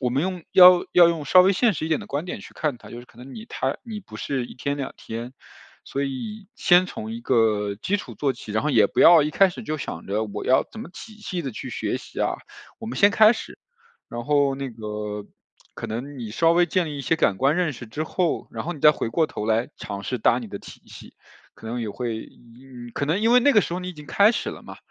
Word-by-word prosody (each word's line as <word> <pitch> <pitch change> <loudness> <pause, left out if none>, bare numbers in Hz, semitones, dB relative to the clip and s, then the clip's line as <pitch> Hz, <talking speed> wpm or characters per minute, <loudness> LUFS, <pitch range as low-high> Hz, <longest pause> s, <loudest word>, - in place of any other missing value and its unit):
我 125 -2 0
们 135 +4 0
用 180 -2 -3
要 180 -1 +10
用 180 - -3
要 175 -1 +7
用 165 -3 -2
稍 185 +6 +7
微 190 +2 +5
现 235 0 +3
实 160 - -4
一 - - -4
点 160 - +1
的 - - -9
观 145 +5 -4
点 - - -5
去 - - -13
看 150 -5 -2
它， - - -15
尤 120 - -8
其 125 - -15
可 - - -23
能 130 +2 -11
你 225 +1 -9
它 - - -2
你 220 -3 -6
不 185 - -12
是 135 -3 -2
1 - - -11
天 140 +3 -3
2 135 -1 -5
天。 115 +3 -7 0.5
所 140 +1 -3
以 195 - -6
先 180 -7 +4
从 220 +3 -7
一 235 - -7
个 105 -4 +1
基 195 - -1
础 - - -9
做 135 -3 -1
起， 110 -3 -9
然 110 - 0
后 150 - 0
也 110 -7 +4
不 - - -2
要 165 -3 +8
一 150 - -1
开 195 +4 +4
始 185 - -8
就 155 -6 -4
想 85 - -6
着 105 +3 -1
我 105 - -6
要 130 - +4
怎 220 - -9
么 175 - -9
仔细地 190 - -6
去 - - -7
学 - - -2
习 - - -8
啊， - - +1 0.4
我 225 - -8
们 - - -5
先 200 +1 +6
开 215 +2 +6
始。 - - -8 0.5
然 120 0 -5
后 145 -1 +2
那 135 -1 -5
个， 105 -2 -6 0.5
可 - - -6
能 130 +5 -6
你 110 -3 -6
稍 165 +8 +3
微 175 0 +4
建 180 0 0
立 145 -2 -6
一 - - -3
些 160 +4 0
感 100 -11 +1
官 140 +5 +2
认 175 -5 0
识 120 -1 -10
之 150 +8 -4
后， 175 0 -1
然 - - -5
后 175 - -3
你 145 - -12
再 150 - +8
回 115 - -3
过 160 +7 +1
头 105 - -5
来 115 +2 +1
尝 100 -1 -6
试 125 +4 -3
搭 120 +3 +3
你 120 - -7
的 100 - -7
体 - - -13
系， - - -13 0.4
可 115 - -12
能 120 +2 -3
也 110 - -3
会 115 0 -5 0.7
可 140 - -2
能 170 +7 0
因 230 +2 +4
为 250 - +7
那 285 +3 +4
个 210 - +6
时 - - -5
候 180 - -3
你 180 - -6
已 180 - -7
经 150 -1 -11
开 205 +7 +4
始 - - -3
了 - - -10
嘛， - - -11
145 Hz, 290 characters per minute, -24 LUFS, 120-180 Hz, 0.7 s, 要